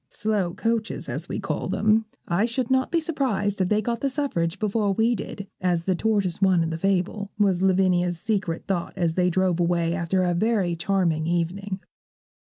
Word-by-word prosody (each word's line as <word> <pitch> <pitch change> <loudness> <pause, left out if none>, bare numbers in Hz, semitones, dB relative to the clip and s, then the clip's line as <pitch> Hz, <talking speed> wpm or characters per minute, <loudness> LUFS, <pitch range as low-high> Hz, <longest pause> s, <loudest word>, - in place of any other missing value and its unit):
Slow 205 -5 -1
coaches 225 -1 -1
as - - -5
we - - -3
call - - -3
them, 215 +1 +2 0.2
I 175 +6 +2
should 240 +1 -2
not 260 0 +2
be 335 - +3
surprised 225 - -1
if 180 - +1
they 215 0 +2
got 235 +1 -1
the 275 - +1
suffrage 210 - -1
before 210 0 0
we 225 +4 +2
did, 205 -3 -5 0.2
as 175 -2 +1
the 185 - +1
tortoise 195 -2 0
won 185 -3 +4
in 165 - -2
the 160 - -2
fable,' 195 +2 0
was 195 -4 +2
Lavinia's 180 -2 +2
secret 195 -6 -1
thought 180 -3 -2
as 170 -2 +1
they 180 +1 +2
drove 180 -1 +1
away, 170 -1 +1
after 185 +1 0
a 175 -1 +1
very 195 -2 +1
charming 170 -3 0
evening. 185 +3 -2
190 Hz, 185 wpm, -25 LUFS, 175-215 Hz, 0.2 s, won